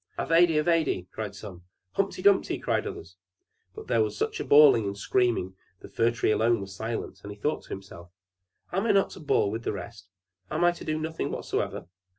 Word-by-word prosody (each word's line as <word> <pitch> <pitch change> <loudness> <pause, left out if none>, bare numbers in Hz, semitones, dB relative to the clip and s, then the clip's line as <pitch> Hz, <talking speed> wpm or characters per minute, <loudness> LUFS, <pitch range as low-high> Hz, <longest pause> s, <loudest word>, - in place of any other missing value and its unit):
"Ivedy 165 +2 +3
Avedy," 155 - +1
cried 105 -2 -5
some; 95 -3 -10 0.3
"Humpy 195 -2 -2
Dumpy," 200 -1 +3
cried - - -1
the - - -2
others. 85 +2 -10 0.7
There 115 - +2
was 105 -1 -1
such - - -2
a - - -2
bawling 140 -7 +6
and 100 0 -4
screaming 115 -4 0 0.3
the - - -11
Fir 115 +1 +2
Tree 115 -2 0
alone 115 +2 +2
was 95 0 -8
silent, 110 +2 -5
and 105 - -8
he 105 - -10
thought 150 +9 -1
to - - -19
himself, 90 -3 -9 0.6
"Am 195 +5 0
I - - +4
not 195 -1 +3
to - - -10
bawl 140 -9 +1
with 115 +2 -4
the - - -2
rest? 100 -2 -9 0.4
Am 155 +3 -1
I 175 - +5
to 175 - -10
do 155 0 -2
nothing 160 +1 -3
whatever?" - - -3
115 Hz, 200 wpm, -27 LUFS, 100-155 Hz, 0.7 s, bawling